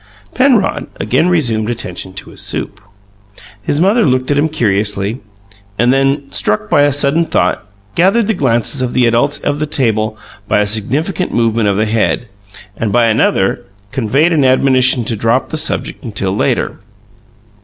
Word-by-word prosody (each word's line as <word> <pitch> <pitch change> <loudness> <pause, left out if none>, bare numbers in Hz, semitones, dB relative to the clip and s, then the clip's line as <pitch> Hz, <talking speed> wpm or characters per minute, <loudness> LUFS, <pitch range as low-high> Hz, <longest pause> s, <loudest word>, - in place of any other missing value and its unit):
Penrod 250 -6 +2
again 175 - +1
resumed 115 -11 0
attention 95 -6 -4
to 95 - -9
his - - -10
soup. 105 - -5 0.8
His 145 +8 -1
mother 205 +7 +3
looked 130 -3 +1
at 145 - +1
him 155 +2 +1
curiously, 105 -4 -1 0.6
and 120 +2 +3
then, 135 +1 +1
struck 105 0 -1
by 145 - +4
a 145 0 +3
sudden 145 +4 +2
thought, 90 +1 0 0.3
gathered 195 - +3
the 220 - 0
glances 130 - 0
of 125 -1 -2
the 125 - +3
adults 120 +5 +1
of 145 0 -2
the 155 - -2
table 110 -7 0 0.3
by - - +2
a 105 - +2
significant 135 - -1
movement 115 -2 +1
of 100 - 0
the 110 - +1
head, 110 +2 0 0.5
and, 110 +1 -2
by 120 +2 +3
another, 110 -1 +1 0.3
conveyed 135 +8 +1
an 150 -3 +2
admonition 130 -2 +3
to 115 - -1
drop 115 +5 0
the 155 - -3
subject 155 - -2
until 100 -5 -3
later. - - -1
125 Hz, 165 wpm, -14 LUFS, 110-145 Hz, 0.8 s, by